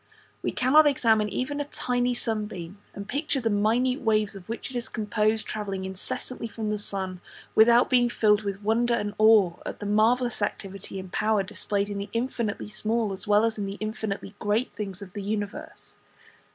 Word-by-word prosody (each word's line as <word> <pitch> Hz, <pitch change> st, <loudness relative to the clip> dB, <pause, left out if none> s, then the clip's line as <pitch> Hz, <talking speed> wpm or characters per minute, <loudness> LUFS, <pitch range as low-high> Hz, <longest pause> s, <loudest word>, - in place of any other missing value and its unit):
We -, -, -1 dB
cannot 295 Hz, +5 st, +5 dB
examine 225 Hz, -6 st, +3 dB
even 265 Hz, +8 st, -2 dB
a -, -, -3 dB
tiny 245 Hz, -3 st, -1 dB
sunbeam, 210 Hz, -5 st, -3 dB, 0.2 s
and 200 Hz, 0 st, -7 dB
picture 285 Hz, +1 st, -1 dB
the 230 Hz, -3 st, 0 dB
minute 235 Hz, +6 st, +2 dB
waves 215 Hz, -3 st, +1 dB
of 195 Hz, +1 st, -11 dB
which 230 Hz, +3 st, -4 dB
it -, -, -9 dB
is 240 Hz, -, -2 dB
composed, 215 Hz, 0 st, 0 dB
travelling 195 Hz, -3 st, -4 dB
incessantly 190 Hz, +5 st, -4 dB
from 220 Hz, -1 st, -4 dB
the 210 Hz, -, -1 dB
sun, 190 Hz, -3 st, 0 dB, 0.3 s
without 235 Hz, +2 st, +6 dB
being 245 Hz, -1 st, +3 dB
filled 210 Hz, -3 st, +3 dB
with 200 Hz, -1 st, -4 dB
wonder 235 Hz, +3 st, +2 dB
and 205 Hz, -2 st, -2 dB
awe 215 Hz, -5 st, +6 dB
at -, -, -5 dB
the 205 Hz, -, -7 dB
marvellous 225 Hz, +3 st, +2 dB
activity 195 Hz, -1 st, -4 dB
and 185 Hz, 0 st, -9 dB
power 210 Hz, -1 st, +2 dB
displayed 205 Hz, 0 st, -2 dB
in 205 Hz, -1 st, -4 dB
the 200 Hz, +1 st, -5 dB
infinitely 230 Hz, -3 st, -2 dB
small 215 Hz, 0 st, -1 dB
as 190 Hz, 0 st, -4 dB
well 210 Hz, +1 st, +5 dB
as 225 Hz, -1 st, -1 dB
in 200 Hz, -, -2 dB
the 195 Hz, +1 st, -5 dB
infinitely 215 Hz, -2 st, -4 dB
great 210 Hz, +5 st, 0 dB
things 200 Hz, -2 st, -5 dB
of 185 Hz, -2 st, -12 dB
the 205 Hz, -, -5 dB
universe. 205 Hz, 0 st, -5 dB
215 Hz, 185 wpm, -26 LUFS, 200-235 Hz, 0.3 s, without